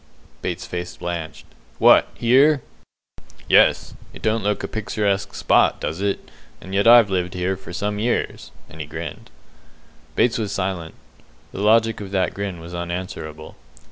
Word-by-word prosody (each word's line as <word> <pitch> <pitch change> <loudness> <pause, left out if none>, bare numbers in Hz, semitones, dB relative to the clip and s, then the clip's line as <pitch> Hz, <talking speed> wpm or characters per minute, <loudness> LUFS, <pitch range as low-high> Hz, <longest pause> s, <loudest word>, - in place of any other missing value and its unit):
Bates's 90 -1 -4
face 90 0 -5
blanched. 85 -2 -5 0.3
"What, - - +6
here?" 135 +4 +4 0.8
"Yes. - - +4 0.2
It - - -12
don't 110 +1 +1
look 105 0 -1
a - - -2
picturesque 105 -2 -2
spot, - - +3
does 80 +5 -4
it? 100 0 -2 0.3
And 95 - -10
yet 100 +3 +2
I've 115 -4 +7
lived 90 0 -1
here 90 +1 -1
for 95 -1 -11
some 105 +3 -2
years"; 120 +3 -2 0.2
and 80 - -10
he 75 - -6
grinned. 80 +2 -7 0.9
Bates 120 -1 +2
was 105 -3 -2
silent. 90 -5 -3 0.6
The - - -6
logic 110 +1 +3
of 100 - -7
that 95 -1 0
grin 100 -3 -4
was 85 +1 -10
unanswerable. 85 -3 -6
95 Hz, 150 wpm, -22 LUFS, 85-105 Hz, 0.9 s, I've